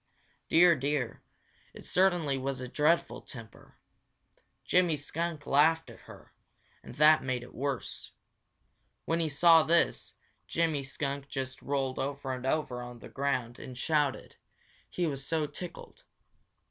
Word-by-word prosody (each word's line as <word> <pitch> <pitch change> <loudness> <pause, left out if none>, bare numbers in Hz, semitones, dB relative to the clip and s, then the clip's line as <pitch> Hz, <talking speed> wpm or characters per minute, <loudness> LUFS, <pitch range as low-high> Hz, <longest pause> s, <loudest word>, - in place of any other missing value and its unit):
Dear, 170 +1 +6
dear, 140 -3 -2 0.5
it - - -11
certainly 175 -6 +2
was 135 0 -3
a 130 - -5
dreadful 155 +6 +1
temper! 115 -4 -12 0.9
Jimmy 175 -4 +3
Skunk 155 +1 -4
laughed 160 +3 +3
at - - -14
her, - - -14 0.5
and - - -11
that 155 +1 +6
made 125 -2 -2
it 120 - -13
worse. 135 -1 -4 0.9
When 165 +1 0
he 160 -2 0
saw 165 +3 +6
this, 170 +2 +1 0.3
Jimmy 160 -3 0
Skunk 140 +1 -4
just 130 -2 -5
rolled 135 -2 -2
over 140 -1 -3
and 130 0 -5
over 135 -4 -1
on 120 0 -8
the - - -12
ground 130 -4 -2
and 125 -1 -9
shouted, 145 0 0 0.5
he 175 - -1
was 140 -4 -3
so 155 +2 0
tickled. 165 +4 -9
145 Hz, 135 wpm, -30 LUFS, 130-160 Hz, 0.9 s, Dear